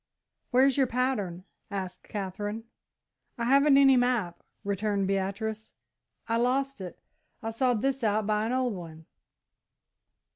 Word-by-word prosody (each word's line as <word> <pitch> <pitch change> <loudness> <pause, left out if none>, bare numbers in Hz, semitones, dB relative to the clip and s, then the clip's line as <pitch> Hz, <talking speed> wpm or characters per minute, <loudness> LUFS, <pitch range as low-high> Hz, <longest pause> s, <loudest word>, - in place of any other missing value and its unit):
"Where's 265 +1 +4
your 270 -2 +3
pattern," 230 -8 -1 0.3
asked 190 -2 -6
Katherine. 205 +2 -4 0.7
"I 235 - -3
haven't 275 +2 +5
any 270 -1 +7
map," 245 -8 +1 0.2
returned 200 0 -1
Beatrice; 200 +3 -3 0.5
"I 230 0 +1
lost 265 +1 0
it. 180 -2 -7 0.5
I 225 - -2
sawed 240 -1 +1
this 270 -1 0
out 215 -1 +1
by 215 +1 +1
an - - -2
old 255 -2 0
one." 160 -3 -9
220 Hz, 125 wpm, -28 LUFS, 195-255 Hz, 0.7 s, any